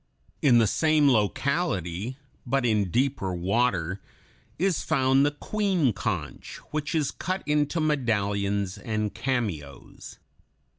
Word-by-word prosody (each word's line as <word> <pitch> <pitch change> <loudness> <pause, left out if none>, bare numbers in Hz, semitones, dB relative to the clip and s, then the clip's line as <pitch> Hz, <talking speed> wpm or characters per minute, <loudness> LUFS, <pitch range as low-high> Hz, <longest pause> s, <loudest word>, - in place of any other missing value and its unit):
In 130 -5 +5
the 115 - +5
same 155 +6 +3
locality, 110 - 0 0.3
but 135 +1 0
in 105 -5 +2
deeper 120 -5 0
water, 95 -1 0 0.6
is 185 -2 +1
found 135 +1 +3
the 145 - +4
Queen 180 - 0
conch 90 - -4
(Fig. - - -13
104), - - -27
which 150 +1 -2
is 150 -3 +1
cut 185 +1 -3
into 150 +2 +1
medallions 100 - 0
and 110 -3 -2
cameos. 100 - -4
120 Hz, 120 wpm, -26 LUFS, 100-145 Hz, 0.6 s, In